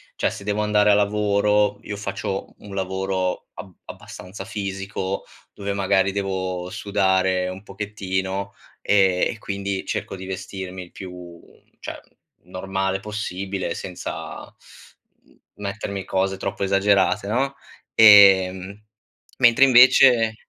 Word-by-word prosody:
cioè, - - 0
se 100 - -9
devo 105 +1 -1
andare 105 0 +3
a - - +6
lavoro 105 0 +2
io 105 - -6
faccio 100 -1 -4
u - - -24
un 100 - -8
lavoro 95 -1 -2
ab 95 - -10
abbastanza 95 +1 -10
fisico, 100 -1 -4 0.3
dove, 100 0 -4
magari, 95 -1 +1
devo 95 -2 -3
sudare 95 -2 +1
un 95 +1 -8
pochettino, 95 -1 -4 0.3
ehm, 95 -3 +3
e 115 - -8
quindi 100 -2 -4
cerco - - -4
di 95 0 -9
vestirmi 95 -1 -6
il 85 - -16
più 90 -2 -10 0.4
cioè, - - -7 0.4
normale 95 +1 -3
possibile, 100 -2 -4
senza, 90 -2 -7 0.8
mhmm, - - -27 0.2
mettermi 100 -1 -5
cose 95 0 -1
troppo 100 +1 -4
esagerate, 100 0 +2
no, 135 +6 -1 0.4
ehm, 100 -2 +6 0.5
mentre 120 +1 +5
invece 125 -3 +6
95 Hz, 120 wpm, -22 LUFS, 95-105 Hz, 0.8 s, a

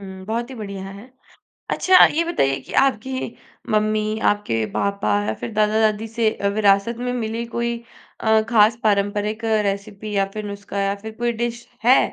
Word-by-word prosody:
हुँ, 190 -1 -9
बहुत 235 +3 -2
ही - - -7
बढ़िया 200 -4 -6
है। 200 +6 -11 0.6
अच्छा, 370 0 +4
ये 330 +3 +1
बताइए 135 - 0
कि - - -12
आपकी 260 0 -2 0.3
मम्मी 215 0 +1
आपके 115 - 0
पापा 200 - -1 0.2
या 110 - -1
फिर 235 - -4
दादा-दादी 215 +1 +2
से 225 0 +1
अ, 200 - -2
विरासत 205 +2 +3
में 245 0 -2
मिली 230 -1 -3
कोई 235 0 -1 0.4
अ, 220 0 +3
खास 220 0 +5
पारँपरिक 205 +1 0 0.2
रेसिपी 200 +1 -4
या 195 0 +3
फिर 215 -1 -5
नुस्का 200 0 -5
या 195 0 0
फिर 220 +1 -7
कोई 240 0 +1
डिश 235 0 -4 0.2
है? 250 +3 +6
215 Hz, 170 wpm, -21 LUFS, 200-235 Hz, 0.6 s, है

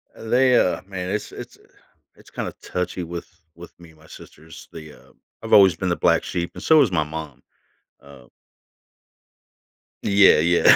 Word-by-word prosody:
they, 125 +2 +2
uh, 90 - 0
man, 90 -2 -6
it's 105 +2 -4
it's - - -11 0.6
it's - - -20
kinda - - -6
touchy 90 0 -4
with 85 0 -8 0.3
with 85 +1 -14
me 85 -1 -15
and 80 - -24
my 80 - -20
sisters. 80 +1 -15
They, 80 -2 -11
uh - - -21 0.3
I've - - -4
always 95 -4 +6
been 90 +3 -3
the 85 - 0
black - - +1
sheep 85 -1 -4
and - - -9
so 160 -1 +5
has 125 -8 +1
my 80 -4 +1
mom. 75 -3 -9 0.6
Uh 70 -2 -17 1.8
Yeah, 100 -5 +5
yeah. 85 +2 +5
85 Hz, 165 wpm, -21 LUFS, 80-95 Hz, 1.8 s, always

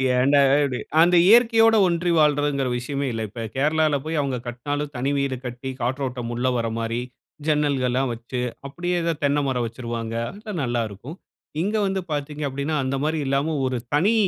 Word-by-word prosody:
ஏன்டா 140 +3 +4 0.2
இப்டி 130 -3 -1 0.2
அந்த 175 +1 +5
இயற்கையோட 225 0 +6
ஒன்றி 175 0 0
வாழ்றதுங்குற 145 -3 +2
விஷயமே 140 +3 -3
இல்ல. 115 -1 -3
இப்ப 115 +1 -6
கேரளால 155 +1 +2
போயி 160 +1 -2
அவுங்க 135 -3 -2
கட்டினாலும், 145 +4 -3
தனி 135 +3 0
வீடு 140 -1 -1
கட்டி 125 +2 -5
காற்றோட்டம் 125 -1 -2
உள்ள 125 +2 0
வர 115 -1 -1
மாரி 115 +1 -2 0.5
ஜன்னல்கள்லாம் 135 -4 +1
வச்சு, 120 +2 -5 0.3
அப்படியே 175 +5 -2
ஏதோ 170 - +1
தென்னை 145 +1 +2
மரம் 125 -3 0
வச்சிருவாங்க. 115 -1 -5 0.2
அங்க 210 +2 -8
நல்லாருக்கும். 120 - -3 0.5
இங்க 205 +3 -1
வந்து 190 0 -1
பாத்தீங்க 150 0 -3
அப்படின்னா, 140 +3 -2
அந்த 135 +1 -1
மாரி 155 +1 0
இல்லாம 140 +4 0
ஒரு 130 - -1 0.2
தனி 195 +9 +3
140 Hz, 160 wpm, -23 LUFS, 125-155 Hz, 0.5 s, இயற்கையோட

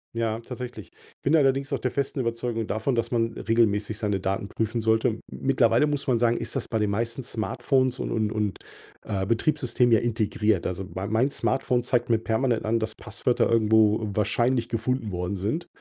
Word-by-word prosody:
Ja, 115 -1 -1
tatsächlich. 125 -2 -8 0.3
Bin 145 - +3
allerdings 135 -1 +2
auch 135 - 0
der 125 - -1
festen 140 +2 -2
Überzeugung 115 -2 -2
davon, 110 +6 -1
dass 115 -1 0
man 115 -1 0
regelmäßig 110 -2 +1
seine 105 -3 -1
Daten 95 +1 -2
prüfen 110 +2 -2
sollte. 110 0 +2
M 110 -1 -2
mittlerweile 130 0 +2
muss 145 -1 -1
man 125 -4 +2
sagen, 120 0 +2
ist - - -4
das 135 - -2
bei 115 - -1
den 105 -2 +1
meisten 115 +4 -2
Smartphones 125 +2 0
und - - -3
und 110 -2 0
und, 105 -2 -2 0.5
äh, 95 -3 -2
Betriebssystem 125 +1 +1
ja 115 - +7
integriert. 110 -3 0
Also, 90 +1 -4
mein 95 +3 -4
mein 125 +6 +2
Smartphone 125 -3 0
zeigt 120 -1 0
mir 115 - +4
permanent 115 +2 0
an, 115 +2 +1
dass 110 0 -3
Passwörter 125 - 0
irgendwo 110 -1 +3
wahrscheinlich 120 +4 +1
gefunden 115 -1 -1
worden 90 +2 -2
sind. 110 - -2
115 Hz, 185 wpm, -26 LUFS, 110-125 Hz, 0.5 s, ja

